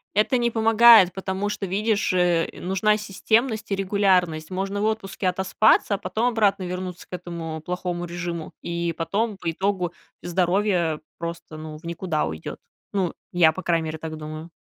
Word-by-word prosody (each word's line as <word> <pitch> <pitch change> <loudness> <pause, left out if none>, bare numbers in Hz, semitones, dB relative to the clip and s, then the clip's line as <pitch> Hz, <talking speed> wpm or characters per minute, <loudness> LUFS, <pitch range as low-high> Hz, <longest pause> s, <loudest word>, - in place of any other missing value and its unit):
Это 215 +5 +3
не 235 -1 +1
помогает, 225 -3 +7
потому 190 +1 -3
что, 205 -1 -3
видишь, 205 +1 0
э, 175 -2 +2
нужна 195 +3 +1
системность 220 +2 0
и - - +2
регулярность. 185 -4 +1
Можно 195 +2 -2
в - - +1
отпуске 200 -3 -2
отоспаться, 190 +2 +3
а - - -3
потом 225 +4 -1
обратно 205 -5 +2
вернуться 180 0 -5
к - - -13
этому 170 -3 -5
плохому 175 0 -3
режиму, 170 -1 -5
и 170 -1 -2
потом 205 +5 -1
по 165 - -3
итогу 185 0 -1 0.3
здоровье 175 -2 +1 0.2
просто 170 -2 -6
ну 155 -1 -8
в - - -25
никуда 170 -2 -1
уйдёт. 80 0 -6 0.3
Ну, 190 -4 0 0.2
я 170 -3 +5
по 185 - -7
крайней 165 -2 +1
мере 160 0 -4
так 160 0 -6
думаю. 155 +2 -8
185 Hz, 165 wpm, -24 LUFS, 170-205 Hz, 0.3 s, помогает